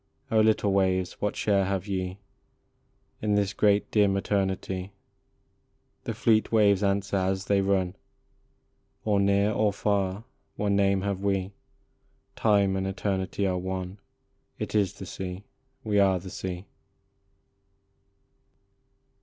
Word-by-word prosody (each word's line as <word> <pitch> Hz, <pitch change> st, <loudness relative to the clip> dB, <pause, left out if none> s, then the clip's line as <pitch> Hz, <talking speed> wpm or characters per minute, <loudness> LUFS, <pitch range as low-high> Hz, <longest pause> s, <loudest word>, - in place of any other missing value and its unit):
O 110 Hz, -, +4 dB
little 110 Hz, -2 st, +3 dB
waves, 95 Hz, -2 st, 0 dB
what 105 Hz, -, -1 dB
share 100 Hz, -2 st, +2 dB
have 95 Hz, -1 st, -2 dB
ye 95 Hz, -2 st, -3 dB, 1.0 s
In 105 Hz, -1 st, +1 dB
this 100 Hz, -1 st, +1 dB
great 105 Hz, -1 st, +2 dB
dim 100 Hz, -2 st, +3 dB
eternity? 95 Hz, -1 st, -2 dB, 1.1 s
The -, -, -3 dB
fleet 110 Hz, -1 st, +2 dB
waves 105 Hz, -3 st, +4 dB
answer 100 Hz, 0 st, 0 dB
as 95 Hz, 0 st, -1 dB
they 100 Hz, -1 st, +2 dB
run: 95 Hz, -1 st, 0 dB, 0.5 s
" -, -, -44 dB
Or 105 Hz, -2 st, +2 dB
near, 100 Hz, +1 st, +3 dB
or 105 Hz, -1 st, +2 dB
far, 100 Hz, 0 st, -1 dB, 0.3 s
one 100 Hz, -1 st, 0 dB
name 100 Hz, -1 st, +2 dB
have 100 Hz, -1 st, -2 dB
we, 95 Hz, -1 st, 0 dB, 0.8 s
Time 100 Hz, -3 st, +3 dB
and 95 Hz, 0 st, -1 dB
eternity 95 Hz, 0 st, -2 dB
are 90 Hz, -1 st, 0 dB
one; 95 Hz, +1 st, -5 dB, 0.6 s
It -, -, -5 dB
is 100 Hz, -4 st, +2 dB
the -, -, -9 dB
sea 95 Hz, +1 st, -6 dB, 0.4 s
we 105 Hz, -1 st, +1 dB
are 95 Hz, -2 st, +4 dB
the 90 Hz, +1 st, -8 dB
sea." 90 Hz, 0 st, -5 dB
100 Hz, 130 wpm, -27 LUFS, 95-100 Hz, 1.1 s, O